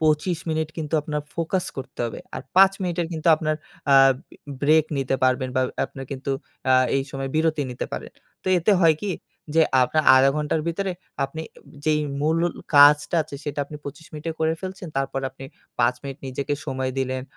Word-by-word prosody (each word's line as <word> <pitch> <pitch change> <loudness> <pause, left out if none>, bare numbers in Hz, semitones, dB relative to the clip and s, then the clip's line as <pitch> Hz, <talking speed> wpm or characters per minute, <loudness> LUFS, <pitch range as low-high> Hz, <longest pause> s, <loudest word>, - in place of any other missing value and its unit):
২৫ 155 +2 +2
minute 160 0 0
কিন্তু 160 -1 -3
আপনার 150 -1 -3
focus 170 +2 -1
করতে 135 -1 -8
হবে। 115 - -4 0.2
আর - - -5
৫ 195 0 +8
মিনিটের 175 -2 -1
কিন্তু 160 0 -1
আপনার 155 -1 -1 0.4
আ - - +7 0.7
ব্রে - - -25
ব্রেক 155 +2 +5
নিতে 135 0 0
পারবেন 130 0 +2
বা 130 - +4 0.2
আপনার 135 - -8
কিন্তু 135 +1 -4 0.4
আ - - +7 0.2
এই 135 - +1
সময় 135 -1 -4
বিরতি 160 -1 +2
নিতে 125 - -4
পারেন। - - -5 0.3
তো - - -25
এতে 175 +5 +3
হয় 165 -3 +6
কি 205 - -2 0.4
যে 165 - +5 0.2
আপনার 155 +5 +2
আধা 130 +1 +6
ঘন্টার 150 +1 0
ভিতরে 190 +3 -1 0.3
আপনি 140 +4 -6 0.4
যেই 155 -1 +2 0.2
মূল 160 +3 +2 0.4
কাজটা 145 +2 +7
আছে 150 -1 -11
সেটা 145 0 -4
আপনি 150 - -9
২৫ 145 +3 -8
মিনিটে 155 +2 -4
করে 160 0 +2
ফেলছেন 185 -1 -6
তারপর 135 0 -1
আপনি 135 +1 -11 0.3
৫ 120 +1 +3
মিনিট 135 -2 -7
নিজেকে 135 +2 -2
সময় 130 -2 -2
দিলেন 130 -1 -1
150 Hz, 185 wpm, -24 LUFS, 135-160 Hz, 0.7 s, ৫